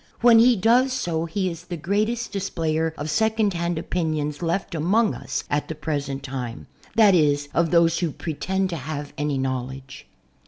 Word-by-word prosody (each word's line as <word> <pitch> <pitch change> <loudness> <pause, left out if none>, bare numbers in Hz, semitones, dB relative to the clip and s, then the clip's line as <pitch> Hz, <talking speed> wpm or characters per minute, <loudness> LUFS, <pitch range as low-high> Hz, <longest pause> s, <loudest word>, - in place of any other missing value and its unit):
When 235 -1 +7
he 240 +1 +6
does 240 +6 +3
so 170 -10 -1
he 185 +3 -2
is 170 +1 -9
the 175 -2 -5
greatest 215 +8 -1
displayer 160 -5 -1
of 145 - -4
second 220 +4 +1
hand 170 -1 -2
opin 160 -1 -1
ions 150 0 -3
left 170 +3 -1
among 200 +8 +2
us - - -4
at 145 0 -1
the 160 - -5
present 140 -3 -3
time, 125 -4 -5 0.3
that 215 -3 +6
is 145 -4 +2
of 170 -1 +2
those 170 0 +3
\vho 170 -5 -2
pretend 185 +4 -2
to 170 - -3
h^ye 145 0 -5
any 145 -1 -1
knowledge. 130 0 -4
165 Hz, 180 wpm, -24 LUFS, 145-195 Hz, 0.3 s, When